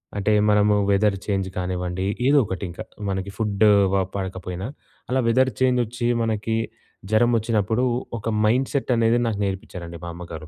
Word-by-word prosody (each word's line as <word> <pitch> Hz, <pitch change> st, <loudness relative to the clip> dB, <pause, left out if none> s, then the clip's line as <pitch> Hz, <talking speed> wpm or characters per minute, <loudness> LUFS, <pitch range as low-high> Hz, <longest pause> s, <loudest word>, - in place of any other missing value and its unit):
అంటే 105 Hz, +1 st, +1 dB, 0.2 s
మనము 105 Hz, 0 st, +4 dB, 0.2 s
weather 100 Hz, 0 st, +2 dB
change 95 Hz, -2 st, -1 dB
కానివ్వండి, 90 Hz, 0 st, -2 dB, 0.2 s
ఏదోకటి 115 Hz, -10 st, +2 dB
ఇంకా. 85 Hz, +6 st, -7 dB, 0.3 s
మనకి 95 Hz, 0 st, -3 dB
ఫుడ్డూ 105 Hz, -1 st, +3 dB, 0.2 s
వ 95 Hz, -1 st, +3 dB
పడకపోయినా, 95 Hz, 0 st, -4 dB, 0.4 s
అలా 130 Hz, -, +1 dB
వెదర్ 130 Hz, +3 st, +3 dB
చేంజొచ్చి 120 Hz, -2 st, +1 dB
మనకి 110 Hz, 0 st, -1 dB, 0.6 s
జరమొచ్చినప్పుడు 110 Hz, 0 st, +2 dB, 0.4 s
ఒక 110 Hz, -, -3 dB, 0.2 s
మైండ్‌‌సెట్ 130 Hz, +3 st, +1 dB
అనేది 115 Hz, +1 st, +3 dB
నాకు 105 Hz, -2 st, -2 dB
నేర్పించారండి 90 Hz, -3 st, -6 dB
మా -, -, -5 dB
అమ్మగారు. 85 Hz, -2 st, -8 dB
105 Hz, 130 wpm, -23 LUFS, 95-115 Hz, 0.6 s, మనము